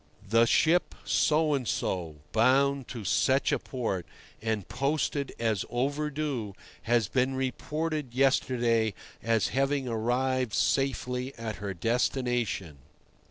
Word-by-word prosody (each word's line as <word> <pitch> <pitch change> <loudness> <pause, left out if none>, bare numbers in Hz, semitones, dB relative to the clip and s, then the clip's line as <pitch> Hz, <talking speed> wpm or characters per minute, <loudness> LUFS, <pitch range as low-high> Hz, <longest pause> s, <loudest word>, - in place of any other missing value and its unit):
"The 115 +3 +4
ship 165 +8 +3
So 155 0 +3
and 130 -4 -1
so, 85 -4 -2 0.2
bound 135 +3 +3
to 115 -4 -7
such 130 +8 +2
a - - +1
port, 110 -9 -3 0.3
and 110 -3 -2
posted 140 +3 -1
as 110 -5 0
'overdue,' 140 -4 -2 0.3
has 120 -4 +3
been 130 +5 +1
reported 150 +1 -3
yesterday 120 -5 +2 0.3
as 115 -2 +1
having 135 0 0
arrived 125 +1 0
safely 125 +1 0
at 110 -4 -5
her 100 -1 -5
destination." 115 - -1
125 Hz, 115 wpm, -29 LUFS, 115-135 Hz, 0.3 s, The